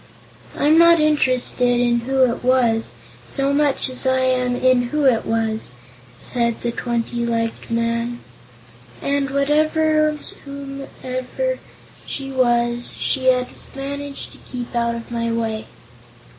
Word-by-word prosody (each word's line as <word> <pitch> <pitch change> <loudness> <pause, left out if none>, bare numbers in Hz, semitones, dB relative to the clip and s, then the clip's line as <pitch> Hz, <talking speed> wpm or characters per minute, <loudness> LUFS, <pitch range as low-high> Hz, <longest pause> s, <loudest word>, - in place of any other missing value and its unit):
"I'm 310 +3 +5
not 335 0 +7
interested 255 -5 +2
in 240 -1 +3
who 265 +2 +2
it 235 - -3
wasn't, 245 -3 +2 0.3
so 275 0 0
much 285 -1 +2
as 255 +1 -3
I 260 0 +3
am 255 -1 +1
in 250 -1 +3
who 300 +1 0
it 245 -4 +3
was," 220 - -1 0.4
said 235 - -1
the 240 - -1
twenty 235 0 -2
legged 230 -1 -2
young 230 - 0
man. 235 +1 -2 0.8
"And, 280 -1 0
whatever 305 +2 +2
or - - -2
whomsoever 275 - -5 0.5
she 270 -1 -4
was, 240 -2 +1
she 265 -2 0
has 250 -1 +4 0.3
managed 280 +1 -5
to - - -12
keep 245 -1 -7
out 235 0 +1
of 230 0 -8
my 230 -1 -1
way." 225 -1 -2
255 Hz, 135 wpm, -21 LUFS, 235-280 Hz, 0.8 s, not